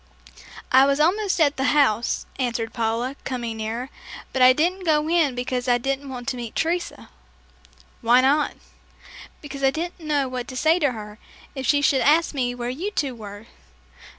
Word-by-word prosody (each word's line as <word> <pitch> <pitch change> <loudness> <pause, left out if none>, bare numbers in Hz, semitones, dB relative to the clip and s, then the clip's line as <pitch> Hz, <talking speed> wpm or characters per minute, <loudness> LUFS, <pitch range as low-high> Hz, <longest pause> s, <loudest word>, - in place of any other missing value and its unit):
"I 265 +1 +6
was 280 +1 +1
almost 375 +5 +2
at 290 -3 +3
the 265 - -1
house," 235 -5 +2
answered 235 -3 -2
Paula, 230 +3 -1
coming 240 -4 -4
nearer, 230 +5 -4 0.4
"but 265 - -1
I 255 0 +9
didn't 350 +8 0
go 305 -2 +2
in 320 -6 +2
because 250 0 -3
I 245 -1 +4
didn't 275 +2 -3
want 250 -1 -7
to 255 - -4
meet 235 -2 -7
Teresa." 340 +2 -2 0.9
"Why 240 +2 +5
not?" 285 +3 +2 0.9
"Because 275 -2 -8
I 270 - +5
didn't 340 +6 -4
know 295 -4 0
what 250 -1 -5
to 255 - -7
say 320 +5 +3
to 285 -6 +1
her, 210 -1 -9 0.3
if 265 -3 -4
she 285 -1 +3
should 270 -2 +3
ask 320 +3 +3
me 245 -3 -1
where 245 0 -3
you 340 +11 -4
two 285 -10 -2
were." 205 -2 -10
265 Hz, 180 wpm, -23 LUFS, 245-300 Hz, 0.9 s, I